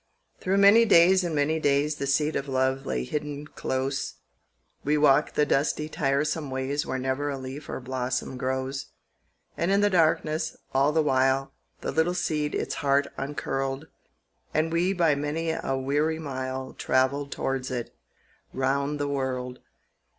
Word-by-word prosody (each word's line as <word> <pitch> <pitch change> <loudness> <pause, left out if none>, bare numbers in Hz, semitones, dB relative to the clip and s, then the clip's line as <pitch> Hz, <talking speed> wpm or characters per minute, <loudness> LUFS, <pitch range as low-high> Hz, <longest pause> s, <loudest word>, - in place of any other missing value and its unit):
THROUGH 190 +1 0
many 200 +4 +7
days 185 -3 +6
and 170 -3 -2
many 150 +2 +1
days 145 +1 +1
The 140 - -3
seed 150 +3 +1
of 140 - -2
love 130 0 0
lay 60 - -1
hidden 150 - -4
close; 135 -1 -3 0.7
We 150 +2 +2
walked 145 0 +4
the 150 - +3
dusty 150 +2 0
tiresome 150 +1 0
ways 130 +2 -2
Where 130 - -2
never 130 +3 -1
a 140 - -3
leaf 135 +3 -8
or - - -4
blossom 130 0 -3
grows. 130 +1 -3 0.7
And 170 - -1
in 200 +1 +3
the 205 0 +3
darkness, 160 -2 +1 0.2
all 135 +2 +3
the 160 0 +2
while, 135 -1 +2 0.3
The - - -2
little 165 +3 +1
seed 150 -3 -1
its - - -2
heart 140 0 +3
uncurled, 135 +1 -3 0.7
And 160 +1 +1
we 175 +3 +2
by 170 -5 +3
many 150 +3 -1
a 135 -4 -2
weary 145 +4 0
mile 130 -3 -5
Travelled 135 +2 0
towards 135 -1 -2
it, 120 -3 -5 0.6
round 140 +2 0
the 145 - -1
world. 130 -2 -3
140 Hz, 155 wpm, -26 LUFS, 130-155 Hz, 0.7 s, many